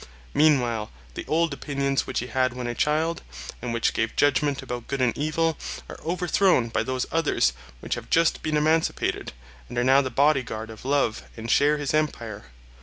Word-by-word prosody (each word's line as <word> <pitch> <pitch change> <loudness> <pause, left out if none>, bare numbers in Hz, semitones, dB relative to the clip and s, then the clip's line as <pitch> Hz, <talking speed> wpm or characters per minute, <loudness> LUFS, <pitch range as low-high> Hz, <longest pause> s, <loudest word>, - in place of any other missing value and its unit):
Meanwhile 120 -8 +3 0.2
the - - -7
old 165 -1 +1
opinions 140 -1 -1
which - - -1
he - - -4
had 130 -1 0
when 125 -1 -4
a 120 - -2
child, 155 +5 0 0.4
and 125 - -3
which 115 0 +1
gave 115 0 -1
judgment 145 -1 +2
about 125 -2 -6
good 140 - -3
and 125 -3 +2
evil, 155 +2 0 0.3
are - - -9
overthrown 175 -5 +2
by - - 0
those 130 0 -2
others 150 - +2 0.3
which - - -3
have - - -6
just 165 0 +3
been 155 -1 0
emancipated, 160 +2 +1 0.4
and 120 - -7
are 120 - +2
now 135 +2 +5
the 130 - -3
body 140 +2 +3
guard 110 -2 -6
of 110 +2 -12
love 135 -5 +1 0.2
and 115 +1 -3
share 150 +1 +4
his 145 -1 -2
empire. 120 - -2
140 Hz, 185 wpm, -25 LUFS, 120-155 Hz, 0.4 s, now